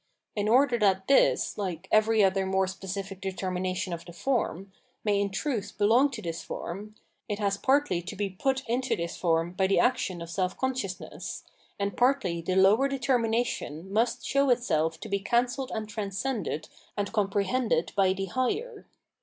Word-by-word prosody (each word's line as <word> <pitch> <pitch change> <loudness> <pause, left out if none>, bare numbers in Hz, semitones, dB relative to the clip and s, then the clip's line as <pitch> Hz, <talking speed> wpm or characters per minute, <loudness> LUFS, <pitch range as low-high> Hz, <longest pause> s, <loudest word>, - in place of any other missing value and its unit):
In 210 0 0
order 250 0 +4
that 190 -2 +2
this, 275 - +3
like 185 -2 -4
every 215 0 +4
other 190 0 +2
more 190 0 +2
specific 195 0 -6
determination 185 -1 -2
of 170 0 -5
the 175 0 -11
form, 195 - -1 0.3
may 205 -2 +2
in 200 - 0
truth 210 0 -3
belong 230 +7 +4
to 240 -6 -7
this 165 0 -4
form, 205 +5 -6 0.3
it 205 - -1
has 200 -2 +1
partly 265 -5 +2
to 190 +4 -7
be 205 0 -1
put 265 +8 -1
into 255 +3 0
this 170 0 -4
form 165 -1 +1
by 190 +1 +2
the 195 - +3
action 190 -8 +1
of 170 0 -7
self 185 +1 -1
consciousness, 255 -8 -4 0.4
and 200 0 -1
partly 245 -10 +2
the 185 +2 -1
lower 200 +8 +5
determination 235 - -1
miist 230 +3 +1
show 275 0 +2
itself 160 -10 +1
to - - -6
be 200 -1 0
cancelled 245 +5 0
and 220 -1 -3
transcended 205 - -3 0.3
and 200 0 -2
com 210 -3 +1
prehended 200 -3 0
by 195 -2 +3
the 195 +1 -2
higher. 405 - -2
200 Hz, 170 wpm, -28 LUFS, 185-240 Hz, 0.4 s, lower